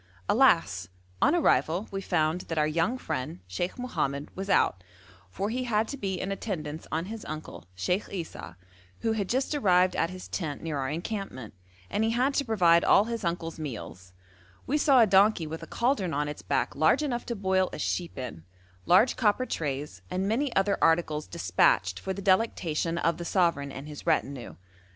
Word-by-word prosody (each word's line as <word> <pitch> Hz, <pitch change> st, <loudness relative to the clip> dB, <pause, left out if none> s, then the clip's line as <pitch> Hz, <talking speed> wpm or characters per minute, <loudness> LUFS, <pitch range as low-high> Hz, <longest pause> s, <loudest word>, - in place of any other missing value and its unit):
Alas! 165 Hz, -, +3 dB, 0.3 s
on 290 Hz, -, +4 dB
arrival 195 Hz, -, +2 dB
we 195 Hz, 0 st, -3 dB
found 170 Hz, -2 st, 0 dB
that 165 Hz, -, -3 dB
our 150 Hz, -, +3 dB
young 165 Hz, +11 st, 0 dB
friend 130 Hz, -, -4 dB
Sheikh 95 Hz, -, -3 dB
Mohammed 145 Hz, -, -3 dB
was 195 Hz, +1 st, -5 dB
out, 90 Hz, -, +2 dB, 0.5 s
for 200 Hz, -, -3 dB
he 255 Hz, +2 st, -2 dB
had 220 Hz, -2 st, +1 dB
to -, -, -4 dB
be 195 Hz, -8 st, -3 dB
in 195 Hz, -, -3 dB
attendance 160 Hz, -7 st, -4 dB
on 160 Hz, +2 st, -1 dB
his 220 Hz, +2 st, -7 dB
uncle, 155 Hz, -, -7 dB
Sheikh 180 Hz, -, -1 dB
Esau, 165 Hz, -, -7 dB, 0.5 s
who 225 Hz, -, +1 dB
had 205 Hz, -4 st, -2 dB
just 265 Hz, +4 st, 0 dB
arrived 185 Hz, -9 st, +3 dB
at 165 Hz, -, +1 dB
his 185 Hz, 0 st, -8 dB
tent 150 Hz, -6 st, -4 dB
near 155 Hz, -3 st, -2 dB
our 130 Hz, -1 st, -2 dB
encampment, 165 Hz, -, -5 dB, 0.3 s
and 210 Hz, -, -1 dB
he 225 Hz, -, +2 dB
had 250 Hz, +5 st, +1 dB
to 280 Hz, -, +1 dB
provide 175 Hz, -8 st, +4 dB
all 200 Hz, -, +6 dB
his 230 Hz, -1 st, -4 dB
uncle's 170 Hz, -1 st, -3 dB
meals; 105 Hz, -, -7 dB, 0.5 s
we 280 Hz, -, 0 dB
saw 280 Hz, -4 st, +5 dB
a -, -, +7 dB
donkey 195 Hz, -2 st, +4 dB
with 160 Hz, +1 st, -6 dB
a -, -, -8 dB
cauldron 235 Hz, -, 0 dB
on 145 Hz, +1 st, 0 dB
its 150 Hz, -, -6 dB
back -, -, -1 dB
large 160 Hz, -, +3 dB
enough 245 Hz, -5 st, -2 dB
to 235 Hz, -, -2 dB
boil 190 Hz, -2 st, +1 dB
a -, -, -6 dB
sheep 175 Hz, -4 st, -2 dB
in, 125 Hz, -11 st, -6 dB, 0.4 s
large 195 Hz, +8 st, +5 dB
copper 230 Hz, +2 st, +2 dB
trays, 140 Hz, -, -4 dB
and 190 Hz, +2 st, -1 dB
many 255 Hz, +6 st, 0 dB
other 200 Hz, +1 st, +2 dB
articles 160 Hz, -2 st, +2 dB
despatched 90 Hz, +1 st, +2 dB
for 190 Hz, -, -4 dB
the 200 Hz, +1 st, -5 dB
delectation 175 Hz, -5 st, +1 dB
of 165 Hz, -1 st, +1 dB
the 175 Hz, -, -5 dB
sovereign 170 Hz, -6 st, +1 dB
and 135 Hz, +2 st, -8 dB
his 150 Hz, -1 st, -9 dB
retinue. 135 Hz, -3 st, -1 dB
180 Hz, 190 wpm, -28 LUFS, 150-215 Hz, 0.5 s, a